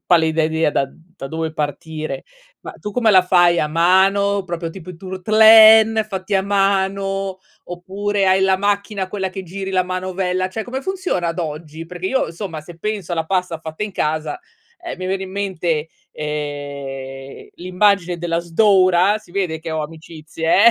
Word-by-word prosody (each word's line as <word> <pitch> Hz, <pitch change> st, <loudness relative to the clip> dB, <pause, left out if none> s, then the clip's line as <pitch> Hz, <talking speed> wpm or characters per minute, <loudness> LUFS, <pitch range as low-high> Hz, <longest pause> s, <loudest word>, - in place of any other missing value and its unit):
pallida 160 Hz, -2 st, +3 dB
idea 160 Hz, -1 st, +1 dB
da 135 Hz, -, 0 dB
da 165 Hz, -4 st, -11 dB
dove 160 Hz, +1 st, -3 dB
partire. 155 Hz, -1 st, -4 dB, 0.4 s
Ma -, -, -8 dB
tu 210 Hz, -, -7 dB
come 225 Hz, 0 st, +2 dB
la 185 Hz, -1 st, +7 dB
fai, 175 Hz, -1 st, +4 dB
a 150 Hz, -, 0 dB
mano 195 Hz, +5 st, +3 dB
proprio 170 Hz, -2 st, -4 dB
tipo 180 Hz, 0 st, -10 dB
i 180 Hz, -, -10 dB
turtlén, 220 Hz, +4 st, +6 dB
fatti 190 Hz, -1 st, -3 dB
a 190 Hz, -, +3 dB
mano 195 Hz, -1 st, 0 dB, 0.3 s
oppure 195 Hz, +3 st, -2 dB
hai 190 Hz, 0 st, +4 dB
la 190 Hz, 0 st, +3 dB
macchina 200 Hz, 0 st, -1 dB
quella 190 Hz, 0 st, -3 dB
che 190 Hz, 0 st, -7 dB
giri 190 Hz, +2 st, -6 dB
la 185 Hz, -1 st, +1 dB
manovella, 185 Hz, 0 st, -2 dB
cioè 220 Hz, +3 st, -5 dB
come 260 Hz, +2 st, -4 dB
funziona 365 Hz, -, -2 dB
ad 165 Hz, -, -4 dB
oggi? 160 Hz, 0 st, -6 dB
Perché 180 Hz, +2 st, -6 dB
io 265 Hz, -4 st, 0 dB
somma, 170 Hz, -3 st, -6 dB
se 165 Hz, +2 st, -13 dB
penso 205 Hz, -4 st, -3 dB
alla 165 Hz, -1 st, -1 dB
pasta 180 Hz, -3 st, -1 dB
fatta 160 Hz, +5 st, -5 dB
in 210 Hz, -, -7 dB
casa, 155 Hz, -, -2 dB, 0.4 s
ehm, 345 Hz, -, -5 dB
mi 185 Hz, -, -4 dB
viene 190 Hz, +1 st, -2 dB
in 190 Hz, -, -7 dB
mente, 175 Hz, -5 st, -2 dB, 0.2 s
ehm, 140 Hz, -3 st, -6 dB
l'immagine 180 Hz, 0 st, +1 dB
della 170 Hz, 0 st, -1 dB
sdora, 185 Hz, +2 st, +3 dB
si 215 Hz, -, -20 dB
vede 180 Hz, -4 st, -2 dB
che 165 Hz, 0 st, -6 dB
ho 160 Hz, -1 st, -2 dB
amicizie, 160 Hz, +3 st, -1 dB
eh! -, -, +10 dB
185 Hz, 170 wpm, -19 LUFS, 160-195 Hz, 0.4 s, eh